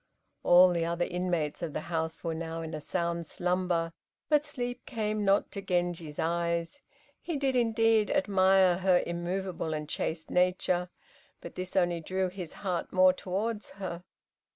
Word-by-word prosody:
All 180 +1 +7
the 170 -2 0
other 170 +1 0
inmates 175 -4 -2
of 165 -4 -4
the - - -2
house 160 -1 -3
were 165 -1 -1
now 165 0 -4
in 160 - -6
a 155 - -4
sound 170 +1 -2
slumber, 180 -2 0 0.4
but 300 -1 +4
sleep 245 -5 -4
came 215 -3 -1
not 195 0 +2
to 200 - -5
Genji's 175 -5 -2
eyes. 170 - -1 0.4
He 335 -4 -3
did, 270 -2 0
indeed, 225 -2 +3
admire 190 -7 +4
her 185 -1 +3
immovable 175 -1 -3
and 150 -1 -4
chaste 160 +1 -3
nature, 180 0 +1 0.5
but 170 - -9
this 185 0 -6
only 175 -2 +2
drew 185 +3 -1
his 180 -3 -7
heart 180 -3 -2
more 185 0 +6
towards 205 +3 -3
her. 180 -3 -5
180 Hz, 155 wpm, -29 LUFS, 170-195 Hz, 0.5 s, All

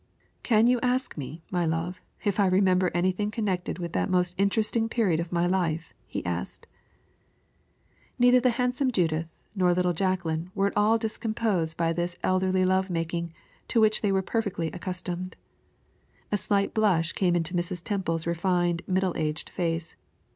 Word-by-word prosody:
"Can 220 -2 +4
you 245 0 +4
ask 250 +1 0
me, 155 +3 -7
my 175 -2 +1
love, 165 +3 -2 0.2
if 205 -1 0
I 200 - +5
remember 185 -1 +3
anything 185 +4 0
connected 200 -5 -2
with 170 -2 -5
that - - 0
most 180 -1 +2
interesting 215 +3 +1
period 200 -9 +1
of 170 0 -4
my 175 0 +1
life?" 170 -3 -1
he - - -5
asked. - - -4 1.5
Neither 245 0 +6
the 250 +1 +3
handsome 250 +1 +1
Judith 165 -6 0 0.3
nor 180 -3 +3
little 180 0 +1
Jacqueline 175 -2 -1
were 195 0 +2
at 200 - -1
all 210 +2 +4
discomposed 215 -6 -1
by 165 -1 +1
this 175 +1 -3
elderly 185 0 +2
love 190 +1 +2
making, 170 0 -2 0.4
to 230 - +2
which 215 -1 +4
they 205 - +1
were 190 0 +1
perfectly 200 -6 -1
accustomed. 180 0 -5 1.0
A - - +3
slight 200 0 0
blush 180 -7 +2
came 180 -3 +1
into 170 +1 -1
Mrs. 175 0 -2
Temple's 170 -6 -2
refined, 175 0 +1
middle 185 -1 +1
aged 155 0 -3
face. 165 -1 -2
185 Hz, 160 wpm, -27 LUFS, 170-205 Hz, 1.5 s, Neither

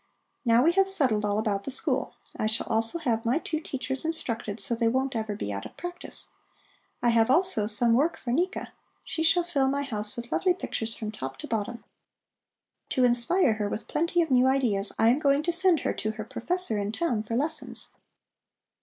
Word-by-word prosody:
Now 235 +1 +5
we 330 - +5
have 390 +2 +2
settled 260 - +2
all 205 0 0
about 205 -2 -1
the - - -5
school. 265 - -1 0.2
I 215 - -1
shall 220 +1 0
also 225 +7 0
have 235 -8 -1
my 240 +5 +2
two 320 -1 -3
teachers 265 -3 -3
instructed, 230 -9 -1
so - - +4
that 230 - -3
they 230 - +3
won't 260 +2 0
ever 220 -2 -2
be 105 - -4
out 100 0 -5
of - - -22
practice. 350 0 -5 0.7
I 240 - +4
have 230 0 +3
also 275 - +3
some 230 +2 +2
work 295 +8 +2
for 240 - -5
Nika: 355 +9 -1 0.3
she 320 - -4
shall 340 +2 +4
fill 285 -6 0
my 280 +1 0
house 210 -6 0
with 235 0 -7
lovely 365 -1 +2
pictures 225 -10 -3
from 215 -2 -5
top 135 -9 -6
to - - -8
bottom. 225 +1 -3 1.1
To 255 - +1
inspire 245 +4 +3
her 210 -1 -2
with 215 - -5
plenty 335 +2 +1
of 320 - -6
new 255 0 +5
ideas, 235 -7 +1
I 225 - +4
am 255 +5 +3
going 280 0 +2
to 345 +1 0
send 360 -2 +4
her - - -1
to 215 - -3
her 215 -1 -6
professor 240 - -2
in 200 +1 -2
town 235 -3 -1
for 225 +2 -4
lessons. 295 +6 -2
240 Hz, 205 wpm, -27 LUFS, 220-320 Hz, 1.1 s, Now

